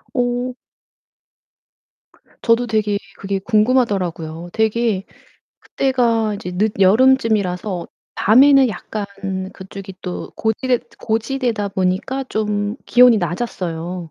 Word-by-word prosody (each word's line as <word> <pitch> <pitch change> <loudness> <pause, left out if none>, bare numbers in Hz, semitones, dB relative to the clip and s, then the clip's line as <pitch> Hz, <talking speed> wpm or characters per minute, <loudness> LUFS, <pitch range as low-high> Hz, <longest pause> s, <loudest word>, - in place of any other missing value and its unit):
어 245 0 0 1.9
저도 235 +1 +2
되게 215 -2 0 0.2
그게 195 0 -3
궁금하더라고요. 195 -8 0
되게 220 -2 +1 0.6
그때가 235 -5 0
이제 180 -3 -6
늦여름쯤이라서 205 -2 +2 0.3
밤에는 270 +4 +6
약간 210 0 -5 0.5
그쪽이 190 0 -10
또 180 -1 -5
고지대 245 +3 0 0.2
고지대다 225 -1 -1
보니까 195 +8 -1
좀 210 0 -1
기온이 245 -1 +6
낮았어요. 175 -2 -4
215 Hz, 235 characters per minute, -19 LUFS, 190-245 Hz, 1.9 s, 밤에는